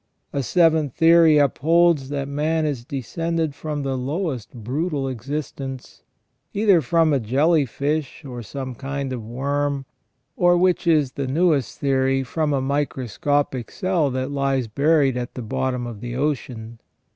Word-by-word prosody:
A 140 - 0
seventh 160 -1 +2
theory 165 -1 +6
upholds 155 +1 +3
that 140 -1 -3
man 155 +3 0
is 140 -6 -2
descended 160 +4 -2
from 150 0 -4
the 135 -1 -1
lowest 130 - -3
brutal 135 +5 -2
existence, 135 0 -6 0.5
either 200 -4 +4
from 165 -2 +2
a 140 - +2
jelly 140 +6 +2
fish 145 +4 -3
or 125 -3 -6
some 130 +3 -6
kind 135 +1 -4
of 120 -3 -5
worm, 140 +4 -2 0.5
or, 175 0 +4
which 180 -1 +2
is 150 -5 +3
the 140 -1 -4
newest 150 -1 +1
theory, 135 -1 +1
from 150 +4 -1
a 140 -2 +1
microscopic 140 -1 -1
cell 180 -6 0
that 130 +1 -3
lies 135 -3 0
buried 140 +2 +2
at 120 0 -5
the 125 - -5
bottom 125 +3 -2
of 115 -4 -7
the 120 0 -5
ocean. 125 -5 -3
140 Hz, 145 wpm, -22 LUFS, 130-155 Hz, 0.5 s, theory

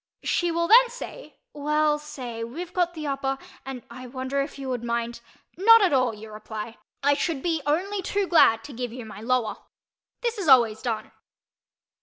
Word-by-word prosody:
She 350 - +1
will 335 0 0
then 480 +4 +7
say - - -9 0.2
"Well 300 +1 +1
say—we've 265 +2 -7
got 350 -1 0
the 310 -1 -5
upper—and 270 -2 -4
I 255 +1 -9
wonder 260 +2 -2
if 280 +1 -5
you 270 -1 -6
would 250 -2 -3
mind—" 235 0 -2 0.4
"Not 455 +4 +7
at, 365 - +3
all," 255 -3 +3
you 215 +1 -11
reply, 215 +1 -7 0.2
"I 285 +1 +5
should 285 -1 -2
be 330 -3 0
only 380 +7 0
too 400 +2 -1
glad 225 -11 +5
to 285 - -9
give 245 0 -4
you 245 -1 -8
my 215 -1 -10
lower." 240 -2 0 0.6
This 470 -2 -2
is 375 - -3
always 235 -5 +5
done. 230 -4 -3
275 Hz, 175 wpm, -25 LUFS, 235-340 Hz, 0.6 s, then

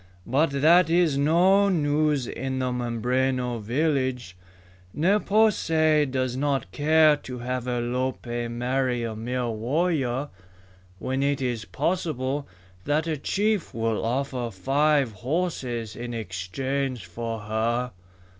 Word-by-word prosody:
"But 145 +7 +2
that 170 +1 +6
is 170 -3 +3
no 180 +8 +4
news 150 -5 +1
in 130 +2 -4
the 130 -1 -1
Mimbreno 125 +1 -1
village. 130 - -1 0.6
Ne 190 +7 +3
po 215 +2 +4
se 155 -5 +2
does 130 -1 -1
not 140 0 -1
care 155 0 +4
to 125 -3 -8
have 125 +1 -3
Alope 120 -1 -2
marry 125 +1 -1
a 115 -1 -3
mere 120 +2 -2
warrior 135 +2 -1 0.7
when 130 +6 -2
it 140 0 +1
is 120 -5 -2
possible 145 -6 -2 0.4
that 150 +2 +1
a 160 -2 -1
chief 205 - -1
will 115 -1 -1
offer 125 0 -1
five 135 +5 +1
horses 125 - -3
in 120 0 -5
exchange 115 +5 -3
for 115 +5 -5
her." 115 +4 -1
130 Hz, 120 wpm, -25 LUFS, 120-150 Hz, 0.7 s, that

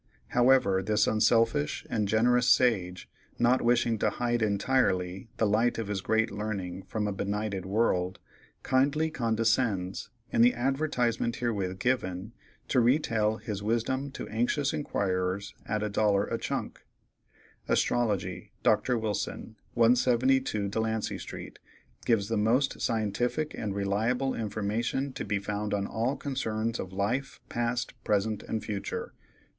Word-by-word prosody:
However, 120 -6 +4
this 105 +2 +2
unselfish 115 -7 +2
and 105 -2 -1
generous 120 +4 +3
sage, 95 -8 +2 0.3
not 120 +2 +3
wishing 120 -2 +2
to - - +2
hide 120 -1 -1
entirely 100 -3 +1
the 110 - +2
light 110 +4 +2
of 110 -3 -3
his 100 -2 -2
great 110 +2 +1
learning 100 -3 -4
from 105 -2 -2
a - - -1
benighted 100 -1 -3
world, 95 -3 +1 0.5
kindly 145 +4 +2
condescends, 115 -6 0 0.2
in - - +3
the 120 +1 +6
advertisement 125 -3 0
herewith 100 -6 -2
given, 100 -4 -1 0.4
to 130 - +3
retail 115 -4 +2
his 105 -3 -5
wisdom 120 +6 -1
to - - -6
anxious 125 +6 0
inquirers 100 -9 -1
at 105 0 -1
a - - 0
dollar 100 -1 +2
a - - -3
chunk: - - -3 0.9
"ASTROLOGY.—Dr. 110 +1 +1
Wilson, 110 0 -3 0.2
172 120 -1 +3
Delancey 110 +1 -2
street, - - -8 0.5
gives 110 -4 +2
the 115 0 -1
most 120 +6 +1
scientific 120 +7 -1
and 100 -2 -4
reliable 110 +7 0
information 115 +5 -2
to - - -4
be 105 - -1
found 105 +1 -2
on 100 -1 -1
all 115 +6 -1
concerns 115 -4 -2
of 95 - -5
life, 115 +8 -2
past, 120 +1 -1
present, 105 0 0
and 110 -2 -4
future. 105 -2 -4
110 Hz, 130 wpm, -29 LUFS, 100-120 Hz, 0.9 s, the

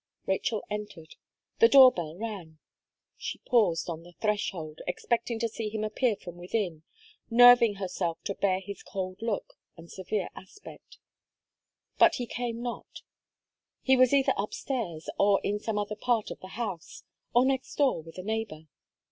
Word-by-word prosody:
Rachel 205 +3 -1
entered; 205 -6 -7 0.5
the 460 - +8
door 265 -2 +9
bell 165 -4 -6
rang. 195 -8 -6 0.6
She - - -5
paused 200 -9 +1
on 165 -2 -5
the 175 +1 -15
threshold, 185 -7 -2
expecting 235 +6 -1
to 230 0 0
see 225 -1 -5
him 215 0 -3
appear 215 +2 +1
from 175 -3 -11
within, 175 -3 -3 0.5
nerving 240 -2 +7
herself 180 -3 -3
to 200 - -2
bear 190 -1 +1
his 200 +1 -8
cold 185 0 -6
look, 225 -3 -3 0.2
and 165 0 -13
severe 190 +1 -3
aspect; 410 - -13 1.0
but - - +6
he 245 - -3
came 235 0 -4
not 240 -1 -7 0.8
He 265 - +5
was 255 -1 +5
either 275 -1 +4
up 200 +2 -3
stairs, 190 - -4
or 200 -1 +4
in 205 +1 -1
some 215 0 -3
other 210 0 -2
part 230 -1 0
of - - -8
the 185 - -10
house, 200 -9 -5 0.3
or 245 +1 +6
next 265 -1 -1
door 275 - +2
with 165 +2 -14
a 185 - -6
neighbour. 205 -8 -4
210 Hz, 160 wpm, -28 LUFS, 180-235 Hz, 1.0 s, door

